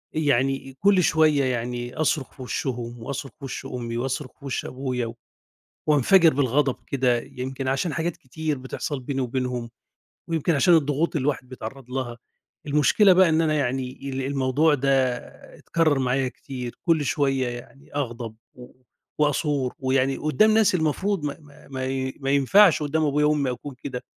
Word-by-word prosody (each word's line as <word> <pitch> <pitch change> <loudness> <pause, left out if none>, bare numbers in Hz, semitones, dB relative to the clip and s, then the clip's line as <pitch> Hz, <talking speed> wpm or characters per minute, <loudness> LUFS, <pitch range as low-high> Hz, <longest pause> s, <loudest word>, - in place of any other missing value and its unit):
إ - - -2
يعني 135 -2 +1
إ - - -17
كل 195 -1 +4
شوية 155 -3 +3
يعني 120 -1 -3
أصرخ 155 -3 0
في 135 - -13
وِشّهم 120 -2 -4
وأصرخ 135 +1 -5
في 140 - -7
وِش 135 - -6
أمي 120 -2 -4
وأصرخ 130 +2 -3
في 140 - -13
وِش 135 - -3
أبويا 125 -2 -3
و 115 0 -7 0.7
وأنفجِر 160 +3 +5
بالغضب 135 0 +1
كده 125 -3 +1
يمكن 130 +2 -5
عشان 135 +5 0
حاجات 170 0 -2
كتير 150 +2 -4
بتحصل 130 +2 -4
بيني 135 +1 -3
وبينهم، 125 -1 -2 0.6
ويمكن 165 0 +1
عشان 170 +5 +5
الضغوط 155 +1 +1
اللي 135 - -1
الواحد 135 -3 -1
بيتعرض 130 +1 -8
لها. 125 -2 -3 0.5
المشكلة 150 +7 +5
بقى 185 0 +6
إن 160 0 +3
أنا 155 -2 +2
يعني 130 -2 -2
ال 135 0 -2
الموضوع 140 +3 +2
ده 135 -1 -1 0.7
اتكرر 155 -4 +1
معايا 130 0 +1
كتير. 125 -2 -7
كل 165 -3 +3
شوية 135 -2 +1
يعني 120 +4 -10
أغضب 120 -5 -4 0.2
و 125 -1 -13 0.5
وأثور، 145 -3 +1
ويعني 135 0 +1
قدّام 215 +8 +3
ناس 220 -3 +4
المفروض 175 +2 0
ما 145 - -2
ما 145 -1 -18
ما 130 -1 -4
ي 130 0 -2
ما 135 -1 -1
ينفعش 155 +6 +5
قدّام 155 +2 0
أبويا 150 0 +2
وأمي 150 -3 +1
أكون 130 +3 -7
كده. 125 -3 -6
135 Hz, 165 wpm, -24 LUFS, 130-150 Hz, 0.7 s, بقى